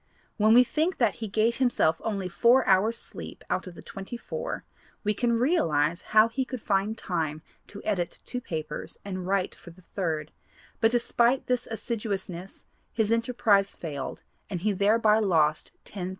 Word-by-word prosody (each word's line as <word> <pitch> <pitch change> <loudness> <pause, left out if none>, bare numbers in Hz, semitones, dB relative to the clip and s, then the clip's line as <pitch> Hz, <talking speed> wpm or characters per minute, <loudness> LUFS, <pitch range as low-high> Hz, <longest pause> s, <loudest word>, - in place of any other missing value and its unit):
When 215 +1 +5
we 250 - +9
think 320 +8 0
that 235 - +2
he 220 - -2
gave 220 +3 +1
himself 235 -11 +2
only 200 -4 -2
four 235 +9 +4
hours 205 +5 +3
sleep - - -9
out - - -1
of 180 - -9
the - - -11
twenty 195 +5 -7
four, 485 - -5 0.4
we 210 0 +1
can 235 +3 +1
realize 170 - +2
how 215 +1 +5
he 230 +4 -1
could 255 -1 -6
find 205 +1 0
time 160 -4 -2 0.2
to 205 - -10
edit 180 -5 -1
two 250 - -4
papers 160 -10 -5
and 185 -2 -4
write 195 -1 0
for - - -14
the 175 +2 -16
third, 160 -5 -3 0.5
but 225 - +5
despite 240 +1 +2
this 250 -1 0
assiduousness 200 -5 -4 0.3
his 220 -1 0
enterprise 230 -4 +2
failed 145 -5 -6 0.3
and 180 -4 -3
he 210 +3 +2
thereby 210 +2 +4
lost 160 -7 +2
$10,000. 185 -3 -5
210 Hz, 165 wpm, -27 LUFS, 180-235 Hz, 0.5 s, we